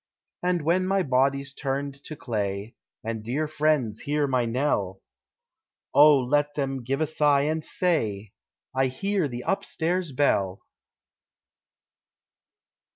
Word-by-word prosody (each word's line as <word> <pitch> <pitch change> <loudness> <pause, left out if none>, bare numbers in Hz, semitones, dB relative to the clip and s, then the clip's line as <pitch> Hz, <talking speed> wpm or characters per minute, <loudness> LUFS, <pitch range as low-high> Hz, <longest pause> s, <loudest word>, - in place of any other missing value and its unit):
And 180 -2 0
when 180 +4 +2
my 195 0 +2
body's 135 0 +1
turned 140 0 -4
to 155 - -6
clay, 105 -4 -3 0.3
And 110 -1 -4
dear 140 +7 -1
friends 150 -8 0
hear 145 0 0
my 130 -3 +1
knell, 115 -6 -1 0.9
Oh 150 0 +7
let 145 +3 +1
them 135 -2 -2
give 135 +5 -2
a - - +3
sigh 145 -2 +3
and 155 +1 -1
say 110 - -1 0.4
I 130 0 +3
hear 185 +6 -1
the 120 -2 -6
upstairs 180 -3 -1
bell! 100 -9 +1
140 Hz, 120 wpm, -26 LUFS, 125-155 Hz, 0.9 s, Oh